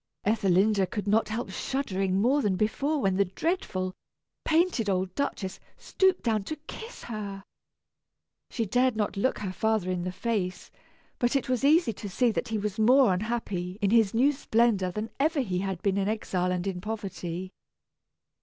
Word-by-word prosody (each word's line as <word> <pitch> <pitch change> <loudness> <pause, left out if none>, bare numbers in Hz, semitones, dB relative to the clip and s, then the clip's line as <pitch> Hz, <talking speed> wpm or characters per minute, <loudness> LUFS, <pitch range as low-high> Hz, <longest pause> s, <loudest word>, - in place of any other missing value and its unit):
Ethelinda 200 -1 +3
could 210 0 -4
not 215 +2 +2
help 220 -2 -3
shuddering 195 -6 -1
more 260 +7 +3
than 205 -6 +1
before 275 +10 0
when 195 -6 +1
the 200 - +4
dreadful, 185 - -2 0.5
painted 320 - +2
old 185 -1 0
Duchess 195 -8 -3 0.2
stooped 380 -1 +1
down 220 -4 +1
to 310 - -4
kiss 450 +7 -9
her. 200 -4 -6 1.1
She 230 - -2
dared 250 +4 +2
not 215 -1 -1
look 200 +7 +1
her 190 -3 -4
father 220 -3 0
in 180 -1 -1
the 180 - -2
face, 185 -3 -3 0.5
but 245 +2 +1
it 275 - +1
was 255 0 0
easy 295 -4 +4
to 205 0 -7
see 240 +5 +2
that - - -2
he 225 - -1
was 210 +1 -3
more 245 -1 +5
unhappy 190 -3 -3
in 200 -2 +1
his 225 -3 +4
new 265 +5 +5
splendor 230 -8 +2
than 215 +4 -4
ever 305 +1 +2
he 185 -7 -2
had 190 -2 -3
been 200 -1 +1
in 195 - 0
exile 185 -4 -1
and 180 0 -2
in 185 -2 -3
poverty. 185 -4 -5
210 Hz, 175 wpm, -28 LUFS, 190-240 Hz, 1.1 s, more